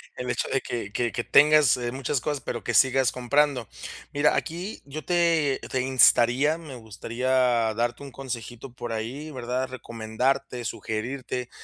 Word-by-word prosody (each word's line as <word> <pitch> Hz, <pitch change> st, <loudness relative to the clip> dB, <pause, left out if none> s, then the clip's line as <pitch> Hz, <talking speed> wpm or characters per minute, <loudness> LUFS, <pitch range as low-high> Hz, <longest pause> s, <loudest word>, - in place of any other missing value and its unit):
El 125 Hz, 0 st, -5 dB
hecho -, -, -1 dB
de 135 Hz, -, 0 dB
que 105 Hz, -4 st, -5 dB
que 120 Hz, -1 st, 0 dB
que 120 Hz, -, -3 dB
tengas 150 Hz, -2 st, +6 dB, 0.2 s
muchas 135 Hz, +1 st, -2 dB
cosas, 145 Hz, -2 st, -2 dB
pero 120 Hz, -, -5 dB
que 120 Hz, -, -2 dB
sigas 130 Hz, +1 st, +4 dB
comprando. 130 Hz, -1 st, +1 dB, 0.5 s
Mira, 145 Hz, +1 st, +3 dB
aquí 175 Hz, +6 st, -4 dB
yo 150 Hz, +2 st, -7 dB
te 165 Hz, -5 st, +2 dB
te 130 Hz, -, 0 dB
instaría, 130 Hz, +3 st, +4 dB
me 155 Hz, -5 st, -10 dB
gustaría 115 Hz, +2 st, -5 dB, 0.4 s
darte 120 Hz, +3 st, -2 dB
un 140 Hz, -, -9 dB
consejito 120 Hz, -1 st, -7 dB
por 120 Hz, -2 st, -5 dB
ahí, 125 Hz, +8 st, -5 dB
¿verdad?, 125 Hz, 0 st, -3 dB
recomendarte, 125 Hz, +1 st, -2 dB
sugerirte 120 Hz, +3 st, -4 dB
130 Hz, 150 wpm, -26 LUFS, 120-140 Hz, 0.5 s, tengas